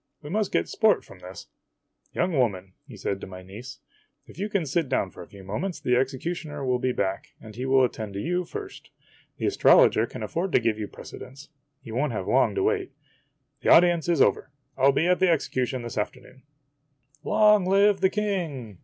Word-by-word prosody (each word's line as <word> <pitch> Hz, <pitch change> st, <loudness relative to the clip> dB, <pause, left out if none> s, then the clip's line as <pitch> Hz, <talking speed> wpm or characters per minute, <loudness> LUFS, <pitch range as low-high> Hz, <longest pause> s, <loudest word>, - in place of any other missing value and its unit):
We 145 Hz, -, -8 dB
must 210 Hz, +1 st, 0 dB
get -, -, 0 dB
sport 220 Hz, -2 st, +2 dB
from 95 Hz, -, -15 dB
this. 90 Hz, 0 st, -10 dB, 0.7 s
Young 175 Hz, -1 st, -1 dB
woman," 95 Hz, -8 st, 0 dB, 0.2 s
said 100 Hz, 0 st, -3 dB
he -, -, -17 dB
to -, -, -7 dB
my 95 Hz, -1 st, -10 dB
niece, 110 Hz, +7 st, -10 dB, 0.2 s
" -, -, -46 dB
if -, -, -15 dB
you 205 Hz, +2 st, -2 dB
can 200 Hz, -6 st, 0 dB
sit 150 Hz, 0 st, -1 dB
down 100 Hz, -8 st, 0 dB
for -, -, -12 dB
a -, -, -10 dB
few 100 Hz, -1 st, -14 dB
moments, 160 Hz, -, -4 dB
the 125 Hz, -, +1 dB
executioner 145 Hz, +3 st, -3 dB
will 125 Hz, -1 st, +1 dB
be 130 Hz, +1 st, 0 dB
back, 95 Hz, -5 st, -3 dB
and 110 Hz, -2 st, -12 dB
he 125 Hz, +2 st, -4 dB
will 135 Hz, 0 st, +4 dB
attend 110 Hz, -5 st, -3 dB
to -, -, -3 dB
you 180 Hz, -, -1 dB
first. 395 Hz, -, -9 dB, 0.5 s
The -, -, -3 dB
astrologer -, -, +5 dB
can -, -, -8 dB
afford 175 Hz, +2 st, -3 dB
to -, -, +5 dB
give 115 Hz, -2 st, -1 dB
you 105 Hz, -, -3 dB
prece -, -, -11 dB
dence. 140 Hz, +3 st, -12 dB, 0.3 s
He 115 Hz, -, -9 dB
won't 130 Hz, +3 st, -1 dB
have 95 Hz, -3 st, -4 dB
Ion" 135 Hz, -, +2 dB
to 390 Hz, -, 0 dB
wait. 410 Hz, -3 st, -1 dB, 0.7 s
The -, -, 0 dB
audience 175 Hz, -1 st, +5 dB
is 165 Hz, -5 st, +4 dB
over. -, -, 0 dB, 0.3 s
I 135 Hz, -, +1 dB
'11 140 Hz, 0 st, +5 dB
be 165 Hz, -, +2 dB
o -, -, +4 dB
at 180 Hz, -, +2 dB
the 185 Hz, -, +3 dB
executions 130 Hz, -5 st, -1 dB
this 120 Hz, -2 st, -4 dB
afternoon." 130 Hz, +5 st, -6 dB, 0.5 s
" 140 Hz, -1 st, -38 dB
Long 210 Hz, -3 st, +4 dB
live 200 Hz, +1 st, +4 dB
the 190 Hz, -, +4 dB
King 165 Hz, -, -3 dB
135 Hz, 215 wpm, -25 LUFS, 115-180 Hz, 0.7 s, astrologer